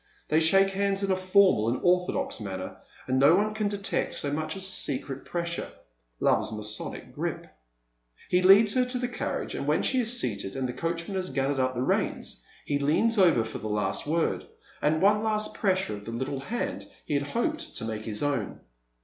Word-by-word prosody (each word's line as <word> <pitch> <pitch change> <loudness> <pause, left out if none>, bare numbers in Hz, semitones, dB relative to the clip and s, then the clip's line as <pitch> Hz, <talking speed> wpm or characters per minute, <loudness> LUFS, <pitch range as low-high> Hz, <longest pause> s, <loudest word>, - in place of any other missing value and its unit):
They 155 - +4
shake 195 +4 +4
hands 200 0 0
in 195 - +1
a - - +3
formal 185 - +4
and 120 - -1
orthodox 180 -5 +1
manner, 95 -3 -6 0.3
and 130 +1 +1
no 145 +5 +7
one 210 +2 +1
can 215 -1 -1
detect 200 -1 -1
so 145 0 -1
much 155 +1 -2
as 190 - -5
a 190 - -2
secret 135 -3 -3
pressure 170 0 -3 0.3
— - - -46
love's - - +2
Masonic 105 0 -4
grip. - - -3 0.8
He 180 - +3
leads 200 +3 +7
her 255 - +3
to 250 0 -2
the 245 0 -1
carriage, 245 - -3
and - - -4
when - - +2
she 260 - +2
is 240 0 +1
seated, 100 -4 -2
and 130 -1 -1
the 125 - -4
coacliman 170 +7 -3
has 185 -1 -2
gathered 135 +1 0
up 130 0 +1
the 125 - -1
reins, - - -1 0.2
he 145 -1 0
leans 200 +11 +2
over 165 -11 +5
for 110 - -6
the 110 - -5
last 105 +3 -1
word, 165 +2 0 0.3
and 155 +3 +2
one 210 +1 +5
last 215 -1 0
pressure 190 - 0
of 105 0 -10
the 115 - -5
Uttle 130 +3 -3
hand 240 +1 -3 0.2
he - - -3
had 140 - +2
hoped 310 - -2
to - - -4
make 110 -1 -4
his 105 +1 -3
own. 140 -8 -1
165 Hz, 205 wpm, -27 LUFS, 130-200 Hz, 0.8 s, no